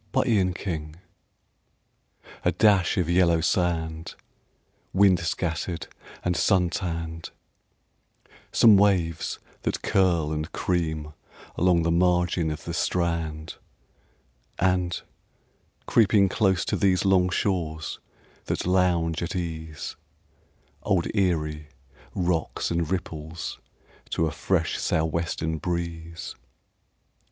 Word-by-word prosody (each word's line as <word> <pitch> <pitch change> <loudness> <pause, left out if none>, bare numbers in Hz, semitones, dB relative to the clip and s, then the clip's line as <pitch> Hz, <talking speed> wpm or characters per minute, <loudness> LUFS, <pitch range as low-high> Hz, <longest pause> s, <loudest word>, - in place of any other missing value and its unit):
ERIE 105 -5 +3
WATERS 85 -4 -4 1.5
A - - +3
dash 100 -5 +3
of 90 -3 +1
yellow 85 -1 +4
sand, 80 -1 -1 0.8
Wind 95 -2 +5
scattered 85 0 -2 0.4
and 90 0 +1
sun 90 -2 +3
tanned; 85 -3 -4 1.2
Some 110 -3 +7
waves 95 -5 +1 0.2
that - - -2
curl 85 -6 +2
and 75 +2 -3
cream 80 -4 -2 0.4
along 90 -1 +3
the 85 - +1
margin 90 -1 +2
of 75 -2 -5
the - - -5
strand; 85 -2 -1 1.0
And, 90 -1 +1 0.9
creeping 100 -3 +4
close 95 -3 +2
to - - 0
these 95 -1 +2
Long 95 -2 +4
shores 80 -5 -2 0.5
that - - -2
lounge 90 -3 +2
at 85 +2 -3
ease, 80 -3 -5 0.8
Old 95 -4 +1
Erie 75 -6 0 0.5
rocks 85 -4 -1
and 85 -2 0
ripples 80 -3 -4 0.5
to 80 - +1
a 80 - -1
fresh 85 +2 0
sou' 80 0 +1
western 80 0 -2
breeze. 85 -1 -4
85 Hz, 100 wpm, -26 LUFS, 80-90 Hz, 1.5 s, Some